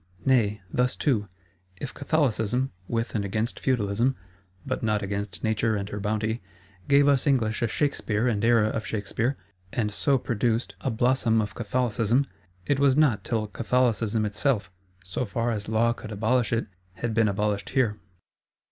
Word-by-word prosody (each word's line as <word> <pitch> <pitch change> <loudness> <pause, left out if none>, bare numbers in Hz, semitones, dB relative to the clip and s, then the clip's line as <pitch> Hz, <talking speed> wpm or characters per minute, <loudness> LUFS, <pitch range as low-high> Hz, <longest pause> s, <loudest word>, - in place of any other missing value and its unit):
—Nay, 105 -6 +2
thus 125 0 +1
too, 110 -8 +1 0.5
if 140 - -5
Catholicism, 130 -4 0 0.2
with 115 0 -2
and 105 - 0
against 110 +4 -2
Feudalism 120 0 +1 0.5
(but 130 -1 -2
not 105 -2 0
against 100 0 -4
Nature 110 0 +1
and 100 -1 -3
her 105 - -4
bounty), 110 +2 -1 0.5
gave 140 0 +5
us 140 0 +3
English 115 -6 +2
a 120 - +2
Shakspeare 115 -3 0
and 110 -3 0
Era 115 -2 +4
of 110 - -2
Shakspeare, 115 +5 -2 0.3
and 105 -3 -1
so 140 +5 +2
produced 120 -1 -1
a - - -1
blossom 120 -1 +2
of 105 -2 -2
Catholicism—it 115 -2 -1
was 140 -1 +4
not 145 -9 +3
till 110 -2 -1
Catholicism 115 -1 +1
itself, 105 -1 0 0.3
so 90 +7 -3
far 115 +2 -1
as 105 -2 -4
Law 115 +1 +3
could 110 - -9
abolish 115 +4 +1
it, 115 0 +1 0.3
had 115 +4 -3
been 115 -1 +3
abolished 100 0 -1
here. 115 -6 +1
115 Hz, 155 wpm, -26 LUFS, 105-125 Hz, 0.5 s, gave